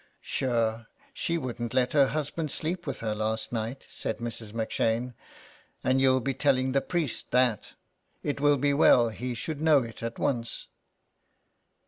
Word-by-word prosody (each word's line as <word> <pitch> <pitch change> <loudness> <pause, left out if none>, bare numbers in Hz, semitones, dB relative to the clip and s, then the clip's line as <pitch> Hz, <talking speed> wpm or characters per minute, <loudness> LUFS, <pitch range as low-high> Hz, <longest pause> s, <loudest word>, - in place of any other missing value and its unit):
*' - - -41
Sure 115 -3 -1 0.3
she 170 -11 -1
wouldn't 120 -4 -4
let 125 -1 +2
her 140 -3 +5
husband 150 +1 -2
sleep 175 +1 -3
with 135 - -4
her 110 -2 -1
last 110 +1 -2
night," 115 +3 -4
said 110 - -3
Mrs. 115 -2 -5
M'Shane, 115 +2 -1 0.4
" - - -29
and 130 +1 +3
you'll 130 -1 +5
be 135 +2 -1
telling 130 -1 +2
the 135 +1 +2
priest 165 -8 -2
that. 125 -4 +1 0.5
It 145 -1 -2
will 145 -1 +5
be 140 +2 +2
well 125 -5 +6
he 120 +3 -4
should 145 +6 -4
know 155 -4 +5
it 115 -1 -9
at 115 0 -4
once.'' 120 -4 -2
130 Hz, 165 wpm, -28 LUFS, 115-140 Hz, 0.5 s, well